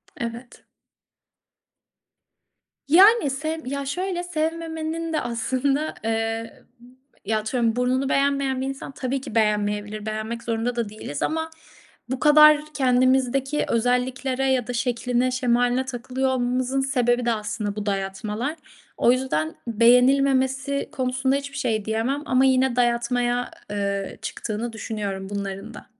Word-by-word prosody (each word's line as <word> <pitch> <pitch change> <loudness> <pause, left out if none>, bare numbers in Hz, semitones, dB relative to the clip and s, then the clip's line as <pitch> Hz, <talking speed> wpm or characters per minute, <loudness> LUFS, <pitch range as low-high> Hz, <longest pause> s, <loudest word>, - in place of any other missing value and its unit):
Evet. 235 +1 -7 2.2
Yani. 390 +3 +6
Sevm 315 +4 -4
Ya 280 +2 -3
şöyle, 355 +4 -2
sevmemenin 325 0 -3
de 310 - +1
aslında, 265 +6 -1
eee, 225 0 -2 0.6
ya 215 +2 +1
atıyorum 225 +1 0
burnunu 255 +2 +1
beğenmeyen 275 -1 +1
bir - - -1
insan, 270 0 -6
tabii 265 0 -3
ki 230 - -8
beğenmeyebilir. 210 -1 0
Beğenmek 220 +2 -4
zorunda 230 +1 -1
da 235 -3 -2
değiliz 205 -9 -7
ama 320 0 -1 0.6
bu 260 - -2
kadar 305 0 +7 0.2
kendimizdeki 260 +2 +2
özelliklere 250 +2 0
ya 250 -3 0
da 245 - -4
şekline 245 0 0
şemaline 245 0 +1
takılıyor 260 +1 -2
olmamızın 255 +1 0
sebebi 245 -2 +1
de 235 - +2
aslında 210 -1 -3
bu 210 0 -4
dayatmalar. 210 +8 -3 0.4
O 240 - +4
yüzden 205 -12 -1
beğenilmemesi 265 +4 +3
konusunda 260 +1 0
hiçbir 280 0 -6
şey 220 -6 -1
diyemem 230 +7 -1
ama 260 -1 +3
yine 260 -1 +3
dayatmaya, 245 0 +1 0.2
eee, 200 -1 -2
çıktığını 225 +1 -4
düşünüyorum 200 -3 -4
bunların 200 +2 -5
da. - - -11
250 Hz, 120 wpm, -24 LUFS, 225-270 Hz, 2.2 s, kadar